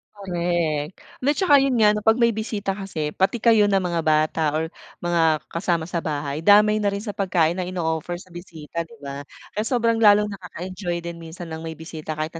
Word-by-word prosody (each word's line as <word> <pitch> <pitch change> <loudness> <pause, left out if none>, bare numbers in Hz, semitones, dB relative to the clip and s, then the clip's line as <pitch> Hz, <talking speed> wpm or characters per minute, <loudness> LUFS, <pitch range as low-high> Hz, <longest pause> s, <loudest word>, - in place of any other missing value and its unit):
Korek. 175 -5 -2 0.2
Lat 285 +3 +2
tsaka, 295 -8 +5
yun 270 -2 +1
nga, 210 -2 +5
'pag 220 +2 +4
may 235 -1 +4
bisita 210 -2 -3
kasi 175 -7 -4
pati 190 +5 +1
kayo 225 -3 +5
na 195 - +3
mga 170 -2 -1
bata 155 +1 +1
or 160 +1 -2 0.3
mga 165 -3 +2
kasama 170 -1 -1
sa 175 -1 -2
bahay, 145 -1 -3
damay 210 +3 +5
na 205 - +2
rin 200 +1 -4
sa 210 -3 -5
pagkain 170 -4 +1
na 180 - -2
ino-offer 170 -2 -2
sa 185 +1 -15
bisita, 170 -2 -6
di 155 -1 -16
ba? 140 0 -6 0.3
Kaya 210 - -1
sobrang 230 -2 +1
lalong 210 -1 +5
nakaka-enjoy 180 -1 -5
din 170 -1 -6
minsan 165 +1 -9
ng 160 - -6
may 160 - -4
bisita 160 -1 -7
kayo 155 +1 -2
kahit - - -41
175 Hz, 200 wpm, -23 LUFS, 160-205 Hz, 0.3 s, tsaka